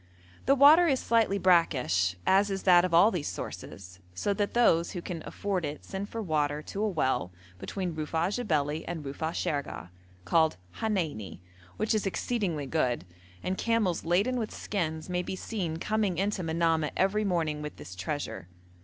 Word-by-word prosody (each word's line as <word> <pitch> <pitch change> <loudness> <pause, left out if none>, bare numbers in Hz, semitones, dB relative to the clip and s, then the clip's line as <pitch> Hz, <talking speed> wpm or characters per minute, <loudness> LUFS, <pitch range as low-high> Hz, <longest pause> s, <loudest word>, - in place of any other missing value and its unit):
The 275 - +6
water 305 +6 +8
is 270 -4 +2
slightly 225 -4 +2
brackish, 130 - +3
as 200 +2 +4
is 195 -1 -3
that 175 -2 +6
of 185 - 0
all 175 +6 +6
these 170 -7 -2
sources, 90 -1 -7 0.2
so 200 - 0
that 205 +2 -2
those 170 -8 +3
who 175 - -4
can 170 -3 -5
afford 195 -3 -2
it 150 0 -5
send 195 +1 -5
for 225 -1 -4
water 150 -3 0
to 200 - -5
a 215 - +2
well 130 - 0 0.3
between 185 - -4
Rufa'a 160 +3 -1
Jebeli 155 -9 0
and 165 -4 -5
Rufa'a 150 +4 -3
Shergeh 145 - -3 0.4
called 160 - +3 0.2
Haneini, 160 - -2 0.4
which 215 +1 0
is 215 -2 0
exceedingly 190 - -1
good, 130 - 0 0.4
and 190 - -2
camels 230 -7 +1
laden 200 +10 +1
with 220 - -2
skins 160 -6 -3
may 180 -1 -1
be 185 - -4
seen 180 -5 -3
coming 210 -1 0
into 200 +1 0
Manamah 165 -2 +1
every 195 +3 +2
morning 165 -6 0
with 150 0 -6
this 90 - -10
treasure. 95 - -4
175 Hz, 170 wpm, -29 LUFS, 150-205 Hz, 0.4 s, water